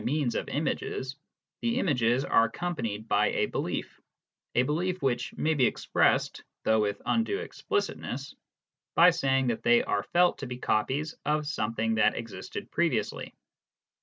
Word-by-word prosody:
27 150 +5 0
means 120 - 0
of - - -3
images, 130 +1 -2 0.5
the 235 +1 0
images 130 - +2
are 115 - +4
accompanied 115 -7 -4
by 105 0 +3
a - - +2
belief, - - -4 0.5
a 125 - +4
belief 175 +7 -1
which 120 -3 0
may 160 - +2
be 130 -5 +4
expressed - - +1 0.2
(though 110 0 +3
with 105 -1 0
undue 230 +13 +1
explicitness) 410 -1 -3 0.6
by 175 +2 +8
saying 135 -5 +1
that 120 -3 -1
they 120 0 +4
are 100 - 0
felt 175 - +2
to 140 - -5
be 125 0 -5
copies 135 +7 0
of 150 +1 0
something 115 -5 -1
that 110 - +3
existed 115 -1 -7
previously. - - -1
130 Hz, 150 wpm, -28 LUFS, 115-160 Hz, 0.6 s, by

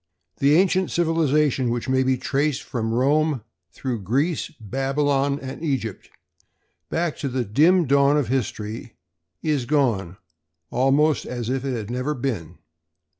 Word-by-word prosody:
The 140 +2 +4
ancient 185 +1 +3
civilization, 150 -6 +2
which 120 0 -2
may 130 0 +2
be 130 0 +2
traced 140 +2 -1
from 115 -2 -3
Rome 140 +2 +2 0.3
through 125 -5 -4
Greece, 140 - 0
Babylon 135 +4 0
and 130 +1 -7
Egypt 130 - -3 0.8
back 165 -2 -1
to 140 - -3
the 130 -2 -1
dim 160 - +4
dawn 140 +1 +4
of 145 -6 0
history, 115 -2 -3 0.5
is 150 -5 0
gone 115 - +1 0.5
almost 140 +5 +2
as 120 -1 -3
if 135 -1 -1
it 135 -2 -2
had 110 -1 -5
never 130 +5 -2
been. 120 - -4
135 Hz, 135 wpm, -23 LUFS, 120-150 Hz, 0.8 s, The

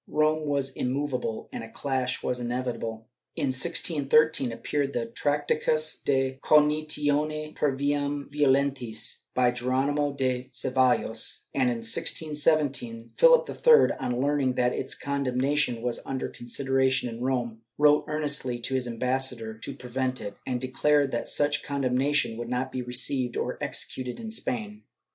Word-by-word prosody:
Rome 155 0 +1
was 140 -2 0
immovable, 130 -3 -2
and - - -6
a 115 - -9
clash 130 0 -2
was 125 - -1
inevitable. 120 -2 -4 0.3
In 140 - 0
1613 155 -1 +2
appeared 140 +4 -2
the 120 - -1
"Tractatus 150 +4 0
de 135 -1 0
cognitione 150 0 +2
per 145 - +1
viam 145 0 -1
violentise" 135 -5 +1 0.2
by 125 -1 +4
Geronimo 135 +4 0
de 130 -2 -2
Cevallos 125 -3 +1
and, 130 -2 +2
in 115 -2 -3
1617, 145 -5 0
Philip - - +6
III, 470 -1 +5
on 125 0 -2
learning 140 -1 +1
that 125 0 +1
its - - -3
condemnation 140 -2 0
was 125 -1 -1
under 135 -1 -3
consideration 130 +1 0
in 115 0 -7
Rome, 120 -4 -2 0.2
wrote 150 0 +5
earnestly 145 -5 -1
to 120 +3 -3
his 130 -2 0
ambassador 125 -1 -2
to - - -6
prevent 130 +1 -3
it, 100 - -6
and 125 -2 -1
declared 135 +2 +2
that 120 - -2
such 145 0 +1
condem 140 -3 -1
nation 135 -3 +1
would 120 0 -5
not 125 +1 -2
be 130 - -3
received 125 0 -1
or - - -3
executed 125 -1 -4
in 225 -1 -6
Spain. 110 - -3
130 Hz, 140 wpm, -27 LUFS, 125-145 Hz, 0.3 s, Philip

